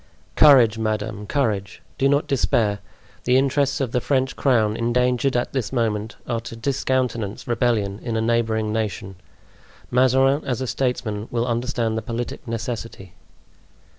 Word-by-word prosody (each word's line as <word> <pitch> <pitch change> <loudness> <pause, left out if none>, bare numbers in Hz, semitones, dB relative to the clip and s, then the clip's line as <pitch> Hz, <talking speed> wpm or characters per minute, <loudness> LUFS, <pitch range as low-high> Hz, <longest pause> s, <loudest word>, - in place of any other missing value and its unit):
"Courage, 125 -7 +6
madame! 105 -1 -2
courage! 105 -9 -1 0.2
Do 135 - +3
not 145 +1 +2
despair! 110 -6 +1 0.5
The 125 +1 +4
interests 140 +2 +1
of 130 -4 -1
the 125 - 0
French 135 0 0
crown, 110 -6 +2
endangered 125 +2 +1
at 120 - -2
this 125 -6 -2
moment, 110 -3 -1
are 120 -2 -1
to 115 - -8
discountenance 125 -4 -2
rebellion 115 -5 0
in 115 -2 -3
a - - +1
neighboring 110 -2 0
nation. 105 -3 -3 0.7
Mazarin, 130 +3 +3
as 125 -2 -2
a 130 - -2
statesman, 120 -5 -2
will 120 0 -1
understand 120 -2 -1
the - - -6
politic 120 +2 -5
necessity." 115 -5 -5
120 Hz, 140 wpm, -22 LUFS, 110-130 Hz, 0.7 s, Courage